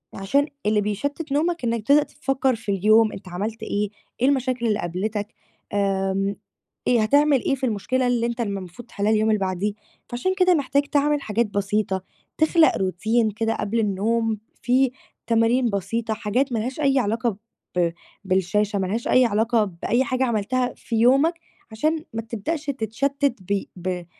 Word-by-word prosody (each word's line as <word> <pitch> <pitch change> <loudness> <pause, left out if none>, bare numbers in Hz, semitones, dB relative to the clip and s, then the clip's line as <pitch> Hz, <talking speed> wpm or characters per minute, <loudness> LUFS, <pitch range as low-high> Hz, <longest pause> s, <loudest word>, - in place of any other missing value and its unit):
علشان 280 +10 +1 0.2
اللي 210 -1 +3
بيشتّت 280 +9 -3
نومك 330 +2 0
إنّك 230 -2 -2
تبدأ 290 +1 +6
تفكّر 270 -4 -1
في 225 -2 -4
اليوم 215 +3 +4
أنت 190 - -9
عملت 215 +5 -4
إيه، 210 -1 -1 0.3
إيه 255 - +4
المشاكل 255 -3 +1
اللي 210 -2 +1
قابلتك، 205 +5 -3 0.4
آمم 195 0 0 0.5
إيه 240 -2 +4
هتعمل 285 +2 +3
إيه 275 - +1
في 265 0 -3
المشكلة 250 +3 0
اللي 240 -1 +1
أنت 235 0 -2
الم 200 -4 -2
مفروض 185 +7 -11
تحلّها 205 0 -1
اليوم 215 0 +2
اللي 215 -1 +2
بعديه؟ 190 +2 -1 0.4
فعلشان 310 +11 -1
كده 365 -1 +5
محتاج 280 -1 +1
تعمل 290 0 +1
حاجات 225 +1 0
بسيطة، 200 -1 -1 0.4
تخلق 315 +1 +5
Routine 215 +4 +1
كده 225 0 0
قبل 215 +3 -1
النوم 220 +2 0 0.2
فيه 255 +1 +3 0.4
تمارين 230 +2 +3
بسيطة 220 +3 -2
حاجات 230 +6 -1
ما 225 - +1
لهاش 250 +6 -4
أي 275 -1 +3
علاقة 225 -1 0 0.4
ب 170 -1 +2 0.3
بالشاشة، 195 +2 +1
مالهاش 195 +5 -2
أي 255 0 +5
علاقة 225 +1 +2
بأي 200 +7 0
حاجة 260 -1 0
عملتها 245 +2 0
في 230 - -5
يومك 270 +8 +4 0.4
عشان 310 +8 -1
ما 225 - -2
تبدأش 235 +8 -4
تتشتِّت 275 +2 -1 0.2
ب 200 -1 +1
ب 180 -1 -4
225 Hz, 160 wpm, -23 LUFS, 205-260 Hz, 0.5 s, تبدأ